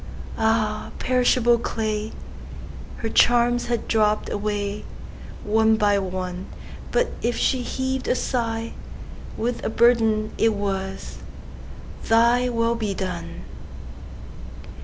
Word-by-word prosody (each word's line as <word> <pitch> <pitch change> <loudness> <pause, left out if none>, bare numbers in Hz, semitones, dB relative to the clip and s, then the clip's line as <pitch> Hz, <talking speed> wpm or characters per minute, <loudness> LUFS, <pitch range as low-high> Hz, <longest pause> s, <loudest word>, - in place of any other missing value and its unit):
Ah, 220 -1 +1
perishable 245 -2 +3
clay! 215 -2 -2 0.9
Her 225 - -3
charms 240 +1 +3
had 235 -1 -2
dropp'd 215 -1 +2
awayOne 210 +1 -2
by 205 -2 +3
one; 185 -1 -4 0.4
But - - +1
if 235 0 0
she 260 - +1
heav'd 260 +1 -3
a - - +3
sighWith 230 0 -4
a - - -1
burden, 220 -2 +3
it 225 -1 +3
was, 195 -1 -4 0.8
"ThyWill 235 0 +2
be 210 -3 -2
done." 180 - -5
225 Hz, 95 wpm, -23 LUFS, 210-235 Hz, 0.9 s, perishable